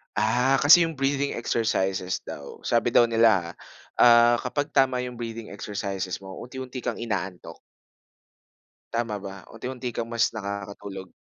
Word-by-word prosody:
Ah, 120 +5 +2
kasi 165 +3 +8
yung 165 - -6
breathing 140 +1 0
exercises 95 -6 -1
daw 70 -1 -8
sabi 120 0 +1
daw 120 - +5
nila 115 -7 +3
ah, - - -18 0.5
ah, 120 0 +7
kapag 145 +4 -3
tama 130 -2 +2
yung 125 -1 -7
breathing 115 -1 -6
exercises 100 -2 -4
mo, 95 0 -9
unti-unti 130 +1 -7
kang 120 -2 -3
inaantok. 95 - -5 1.4
Tama 115 -2 -1
ba 95 0 -6 0.2
unti-unti 125 +2 -5
kang 115 0 -3
mas 115 -1 +3
nakakatulog? 100 -2 -6
115 Hz, 140 wpm, -25 LUFS, 100-125 Hz, 1.4 s, kasi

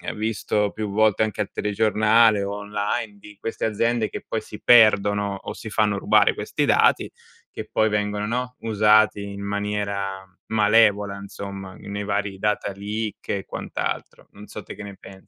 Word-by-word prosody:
visto 105 -1 -1
più 110 -1 -4
volte 110 0 +3
anche 110 -1 -2
al 105 - -4
telegiornale 110 +1 +3
o 100 +1 -3
online, 105 0 -3
di 105 0 -14
queste 115 - -3
aziende 110 +1 0
che - - -7
poi 110 - -2
si 105 0 -11
perdono 105 -3 +5
o - - -5
si 110 - -8
fanno 105 -2 +1
rubare - - +4
questi - - -2
dati, - - +3 0.4
che - - -7
poi 110 0 +2
vengono, 105 0 -1
no, 125 +2 -3
usati 105 -2 +3
in 100 0 -7
maniera 100 -1 -3 0.2
malevola 105 -2 +3
insomma, 100 -1 -8
nei 100 +2 -6
vari 100 -1 -2
data 105 0 -1
leak 105 +2 -5
e 100 - -2
quant'altro. - - -5
Non 105 +1 -12
so 105 - -8
te - - -9
che 105 - -9
ne 100 -1 -9
pensi. 95 0 -14
105 Hz, 165 wpm, -23 LUFS, 100-110 Hz, 0.4 s, perdono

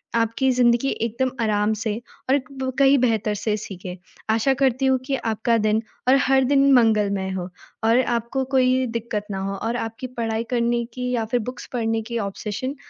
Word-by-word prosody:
आपकी 230 +3 +1
ज़िंदगी 245 +1 +3
एकदम 235 +3 -1
आराम 210 0 +1
से 215 0 -2 0.3
और 275 - +5 0.4
कहीं 275 0 +6
ब - - 0
बेहतर 220 -4 +1
से 210 +1 -1
सीखें। 185 -3 -7 0.4
आशा 230 +5 +2
करती 265 0 +2
हूँ 265 0 +4
कि 270 - 0
आपका 230 -1 0
दिन 215 0 +1 0.3
और 260 - +6
हर 265 0 +4
दिन 275 +1 +4
मंगलमय 210 -5 +3
हो 180 0 -5 0.3
और 230 +3 +4 0.2
आपको 235 +3 -2
कोई 255 0 +3
दिक्कत 230 -2 -3
ना 195 - -3
हो 195 0 -3
और 225 +4 -3
आपकी 225 +2 -5
पढ़ाई 225 -1 -1
करने 235 -1 +1
की 250 0 -3
या 230 -3 0
फिर 245 +3 0
बुक्स 250 - -8
पढ़ने 225 -2 0
की 235 +2 -5
ऑब्सेशन 210 +6 -4
230 Hz, 180 wpm, -23 LUFS, 215-255 Hz, 0.4 s, कहीं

